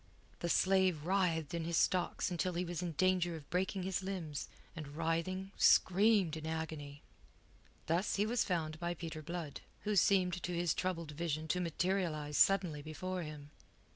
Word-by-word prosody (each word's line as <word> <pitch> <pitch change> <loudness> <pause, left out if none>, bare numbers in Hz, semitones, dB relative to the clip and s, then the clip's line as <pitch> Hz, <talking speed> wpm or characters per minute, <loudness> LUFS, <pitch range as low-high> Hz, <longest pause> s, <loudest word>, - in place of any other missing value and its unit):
The 170 - -2
slave 185 -4 +3
writhed 170 -5 +1
in 170 -1 -1
his 165 0 -1
stocks 180 +1 +1
until 180 +1 -1
he 175 +1 -1
was 175 0 -4
in 175 -2 -3
danger 180 +1 +2
of 150 -3 -10
breaking 185 +1 0
his 190 0 -1
limbs, 170 -8 -4 0.3
and 150 -3 -7
writhing, 170 +4 -1
screamed 195 -3 +5
in 160 0 -5
agony. 155 -3 -5 0.8
Thus 175 +6 0
was 220 +4 +1
he - - -9
found 160 -4 -1
by 175 0 -2
Peter 160 -2 -6
Blood, 165 -2 -5 0.2
who 210 0 0
seemed 180 -2 +3
to 175 +1 -3
his 170 -2 +1
troubled 170 -4 -2
vision 155 0 -3
to 180 - +1
materialize 170 -3 -1
suddenly 180 -7 +4
before 180 +5 -4
him. 150 -2 -8
170 Hz, 165 wpm, -35 LUFS, 160-185 Hz, 0.8 s, screamed